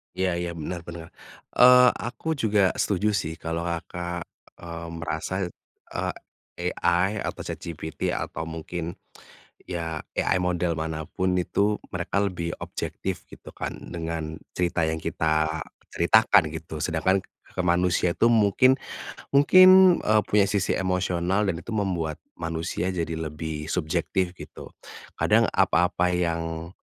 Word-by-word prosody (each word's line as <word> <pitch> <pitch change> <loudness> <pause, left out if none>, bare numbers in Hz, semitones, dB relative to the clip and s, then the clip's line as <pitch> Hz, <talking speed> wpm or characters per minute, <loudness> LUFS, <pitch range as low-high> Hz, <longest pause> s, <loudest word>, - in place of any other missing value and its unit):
Iya 95 -1 +1
iya 85 -1 -3
benar 85 +2 -4
benar, 85 -1 -8 0.5
eee, 125 0 +9 0.2
aku 120 - -8
juga 105 -4 +3
setuju 105 +2 +1
sih 80 -6 -2
kalau 80 +1 -3
Kakak, 85 +1 -4 0.4
eee, 85 0 -6
merasa, 85 +2 -3 0.6
eee, - - -2 0.7
AI 90 +4 +2
atau - - -4
ChatGPT 80 -1 -4
atau 80 0 -4
mungkin, 80 +1 -5 0.7
ya 80 -3 -3 0.2
AI - - +2
model 90 -1 0
mana 80 0 -3
pun 95 0 -1
itu 100 +3 +1
mereka 95 +2 -1
lebih 85 -4 -3
objektif - - -5
gitu - - -12
kan - - -5 0.2
dengan 80 -2 -4 0.2
cerita 90 -1 0
yang 80 0 -1
kita 80 0 0 0.3
ceritakan 105 0 +5
gitu 80 -1 -7
sedangkan 90 +3 +2 0.4
ke - - -6
manusia 90 0 +2
itu 115 - +4
mungkin 115 +4 +5 0.6
mungkin, 185 +5 +8
eee, 110 0 +4
punya 105 -1 +4
sisi 100 -1 +1
emosional 90 +1 0
dan 85 -4 -1
itu - - -9
membuat 85 -7 -1 0.2
manusia 80 +1 -2
jadi 85 -2 -2
lebih 80 -1 -5
subjektif 90 +2 0
gitu, - - -10 0.5
kadang - - +4
apa-apa 90 0 +2
yang, 85 -1 -2
85 Hz, 125 wpm, -25 LUFS, 80-95 Hz, 0.7 s, eee